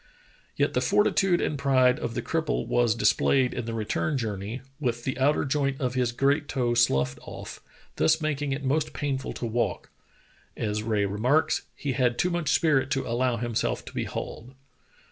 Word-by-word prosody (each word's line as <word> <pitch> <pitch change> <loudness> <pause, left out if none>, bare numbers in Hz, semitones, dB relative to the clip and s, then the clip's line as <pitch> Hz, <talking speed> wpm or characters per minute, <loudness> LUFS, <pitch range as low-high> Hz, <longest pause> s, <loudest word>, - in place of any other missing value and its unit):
Yet - - +1
the 125 - +1
fortitude 190 +5 +3
and 145 - -1
pride 130 -2 +3
of 115 - -4
the - - -2
cripple 160 -1 -1
was 120 -2 +2
dis 105 -3 +4
played 130 -2 +2
in 120 - -4
the 115 - -4
return 115 +7 -1
journey, 110 0 -4 0.2
with 120 -4 -2
the 130 - -2
outer 145 +3 +2
joint 140 -1 0
of 125 -2 -1
his 125 -2 +1
great 140 +4 +1
toe 120 -2 0
sloughed 70 - +2
off, - - -9 0.4
thus 80 - +3
making 145 -2 -2
it 140 +1 -3
most 145 +3 0
painful 135 -2 -2
to - - -5
walk; 115 +1 -2 0.7
as 105 0 -1
Rae 110 -2 0
remarks, 120 +10 +1
"He 145 - -3
had 125 -2 +1
too 180 - +1
much 170 -3 -1
spirit 135 -5 +3
to 135 - -1
allow 120 +1 0
himself 120 -1 -2
to - - -10
be - - -2
hauled." 125 +4 -7
130 Hz, 185 wpm, -26 LUFS, 115-140 Hz, 0.7 s, dis